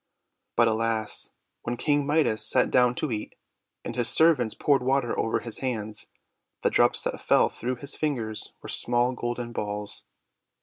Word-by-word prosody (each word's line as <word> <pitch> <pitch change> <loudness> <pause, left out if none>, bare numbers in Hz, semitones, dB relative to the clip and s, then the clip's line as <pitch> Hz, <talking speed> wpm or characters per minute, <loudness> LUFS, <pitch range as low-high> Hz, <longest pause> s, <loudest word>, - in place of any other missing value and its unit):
But, 115 -1 +5
alas! 110 -1 -1 0.3
when 120 +1 -3
King 145 0 +1
Midas 145 -8 +2
sat 110 - +2
down 125 -1 +4
to 150 -1 -2
eat, 105 -1 -4 0.5
and 115 - -5
his 120 -2 0
servants 145 -9 +4
poured 140 -3 +2
water 130 -1 +1
over 115 - 0
his 115 -2 -3
hands, 110 -5 -4 0.6
the - - +3
drops - - +3
that - - -3
fell - - +4
through 125 +2 -3
his 140 +4 -2
fingers 120 -8 -2
were - - -7
small 120 +1 +1
golden 120 -1 -4
balls. 105 -2 -5
120 Hz, 160 wpm, -26 LUFS, 110-135 Hz, 0.6 s, But